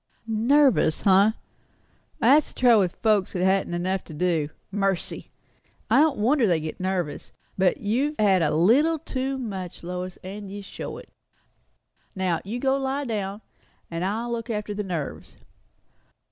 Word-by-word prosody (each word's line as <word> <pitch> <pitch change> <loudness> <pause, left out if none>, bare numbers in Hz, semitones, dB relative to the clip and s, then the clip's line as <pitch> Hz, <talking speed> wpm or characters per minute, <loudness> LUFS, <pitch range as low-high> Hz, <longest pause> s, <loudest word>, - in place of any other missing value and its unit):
Nervous, 235 - +3
eh? 200 +2 +5 0.8
That's 295 +2 +4
the - - -14
trouble 240 -4 +6
o' 185 - +3
folks 205 +1 0
that 180 0 0
haven't 190 -2 +1
enough 185 +2 -1
to 155 - -10
do. 160 -3 0 0.2
Mercy! 195 -2 -2 0.6
I - - +6
don't 305 -1 +3
wonder 245 +3 +3
they 170 -4 +2
get 155 0 -6
nervous. 185 -5 -3 0.2
But 185 -1 +2
you've 255 +8 0
had 195 -4 +3
a 155 - +2
little 250 - +3
too 270 -3 -3
much, 195 -10 -6
Lois, 180 +1 -5
and 200 +2 -7
you 205 0 -7
show - - -7
it. - - -12 1.1
Now, 185 -3 0
you 215 +5 -4
go 265 +1 +1
and 275 - -4
lie 275 +2 -1
down. 205 -3 -3 0.5
I'll 200 +8 -2
look 235 0 -4
after 210 -2 -3
the 205 - -3
nerves." 175 -7 -5
200 Hz, 155 wpm, -25 LUFS, 185-240 Hz, 1.1 s, trouble